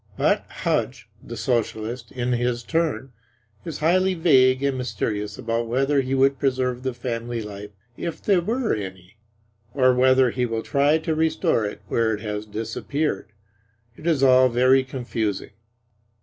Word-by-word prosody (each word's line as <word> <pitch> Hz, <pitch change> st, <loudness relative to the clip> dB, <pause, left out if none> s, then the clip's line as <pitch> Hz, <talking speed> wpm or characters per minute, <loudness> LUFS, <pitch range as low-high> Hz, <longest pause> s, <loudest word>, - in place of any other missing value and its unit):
But -, -, +2 dB
Hudge, -, -, -2 dB
the -, -, -8 dB
Socialist, 115 Hz, -1 st, -2 dB
in 125 Hz, -1 st, -2 dB
his 120 Hz, 0 st, 0 dB
turn, 155 Hz, -3 st, -1 dB, 0.5 s
is 160 Hz, -4 st, -5 dB
highly 185 Hz, +4 st, +2 dB
vague 130 Hz, -6 st, +4 dB
and 140 Hz, -1 st, +1 dB
mysterious 105 Hz, -5 st, -3 dB
about 115 Hz, 0 st, -2 dB
whether 135 Hz, +4 st, +2 dB
he 130 Hz, +1 st, -2 dB
would 135 Hz, 0 st, +3 dB
preserve 130 Hz, -2 st, 0 dB
the 130 Hz, -1 st, -3 dB
family 120 Hz, -1 st, -4 dB
life 105 Hz, 0 st, -8 dB, 0.3 s
if 170 Hz, -, -4 dB
there 195 Hz, -4 st, +2 dB
were 230 Hz, +5 st, -1 dB
any; 95 Hz, -1 st, -7 dB, 0.6 s
or 130 Hz, -2 st, +4 dB
whether 130 Hz, 0 st, +4 dB
he 125 Hz, 0 st, -1 dB
will 115 Hz, -1 st, -3 dB
try 145 Hz, +3 st, +2 dB
to 160 Hz, 0 st, -2 dB
restore 155 Hz, -8 st, +1 dB
it 105 Hz, -, -6 dB
where 110 Hz, -1 st, +1 dB
it 105 Hz, -, -10 dB
has 105 Hz, 0 st, -4 dB
disappeared. 115 Hz, +4 st, -3 dB, 0.6 s
It 155 Hz, -, -8 dB
is 155 Hz, -5 st, +2 dB
all 130 Hz, -1 st, +6 dB
very 130 Hz, +2 st, +4 dB
confusing. 120 Hz, -6 st, -3 dB
130 Hz, 150 wpm, -23 LUFS, 115-140 Hz, 0.6 s, all